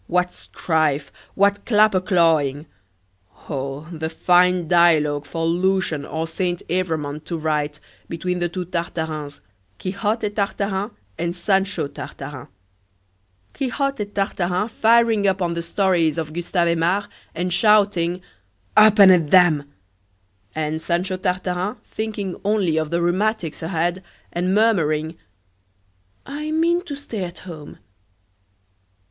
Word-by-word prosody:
what 180 0 0
strife! 155 -4 -1 0.2
what 200 +1 +2
clapper 210 -4 +4
clawing! 160 -6 +2 0.8
Oh, 140 +1 -4
the 160 -1 -4
fine 180 +1 +3
dialogue 155 -4 +3
for 165 -1 -3
Lucian 175 -3 0
or 160 0 -3
Saint 175 +1 -2
Evremond 160 -5 -2
to 170 - -3
write, 150 -1 -1 0.3
between 180 +2 -2
the 175 0 0
two 180 +1 -4
Tartarins 160 -4 -4 0.4
Quixote 205 - -2
Tartarin 200 0 -2 0.3
and 170 0 -2
Sancho 195 -2 0
Tartarin! 140 -1 -8 1.1
Quixote 275 -3 -2
Tartarin 195 -1 -1
firing 225 -2 +3
up 190 0 +1
on 175 -2 0
the 170 - -3
stories 170 -2 +1
of 155 -2 -4
Gustave 175 0 0
Aimard, 175 +5 +1 0.3
and 180 +1 -1
shouting: 195 -4 +3 0.5
"Up 215 0 +7
and 195 -2 +9
at 165 -5 +3
'em!" 155 -6 +4 0.8
and 155 0 -2
Sancho 180 +3 -1
Tartarin 185 +1 -2
thinking 210 -4 -5
only 200 -6 +1
of 155 -1 0
the 170 +1 0
rheumatics 180 -1 0
ahead, 170 +2 -1 0.3
and 180 +3 0
murmuring: 165 -8 +2 1.1
"I 295 +3 -5
mean 335 +3 +2
to 290 -5 -5
stay 235 -8 -5
at 175 0 -7
home." 155 -5 -9
180 Hz, 120 wpm, -22 LUFS, 160-200 Hz, 1.1 s, and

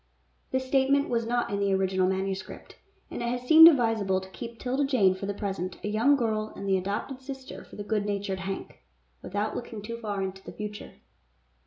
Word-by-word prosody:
This 260 0 -1
statement 275 +1 +2
was 230 -1 0
not 240 -2 0
in 200 - -1
the 200 -1 +1
original 190 -1 +1
manuscript, 190 0 -4 0.4
and - - -5
it 235 - -1
has 245 0 -3
seemed 320 +5 +10
advisable 225 - +3
to 190 0 -11
keep 230 +3 -8
'Tilda 260 +4 -1
Jane 225 -9 +3
for 190 +1 -6
the 200 - -1
present 190 -3 -4
a - - -2
young 230 +7 +4
girl 215 -4 -1
and 200 - -6
the 195 - +3
adopted 200 +8 -3
sister 265 0 -8
of - - -11
the 205 - -4
good 210 -1 -1
natured 200 -2 -2
Hank, 190 0 -6 0.4
without 205 +3 -2
looking 235 -2 -6
too 230 +2 -5
far 205 -4 -3
into 190 0 -5
the - - -9
future. 210 0 -7
210 Hz, 200 wpm, -28 LUFS, 195-245 Hz, 0.4 s, seemed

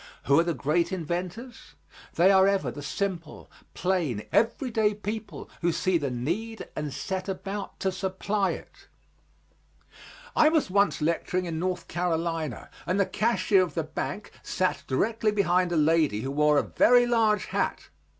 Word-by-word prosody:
Who 140 +3 +4
are - - +4
the 170 -2 -1
great 165 +6 0
inventors? 185 - -5 0.4
They 185 +3 +5
are 190 0 +6
ever 200 -1 +1
the 145 - -8
simple, 170 0 -4 0.2
plain, 165 - -1
everyday 225 -2 +1
people 210 +1 -6
who 170 0 +2
see 180 +1 +1
the 140 -2 -2
need 175 - -3
and 150 -1 -3
set 190 +6 -4
about 195 +1 -5
to 190 - +1
supply 190 +1 -1
it. - - -12 1.5
I 310 - +6
was 315 - +1
once 200 -5 +2
lecturing 175 +3 0
in 165 -2 -3
North 180 +1 -2
Carolina, 165 -5 -2 0.2
and 185 +3 +1
the 200 - +4
cashier 195 -1 +2
of 175 -5 -2
the 165 - 0
bank 175 +6 -5
sat 185 -6 -1
directly 220 - +1
behind 185 -3 +2
a 170 - +1
lady 155 -8 +2
who 135 +3 -3
wore 150 +1 +3
a - - +3
very 245 0 +4
large 225 -3 +2
hat. - - -2
185 Hz, 155 wpm, -27 LUFS, 160-205 Hz, 1.5 s, are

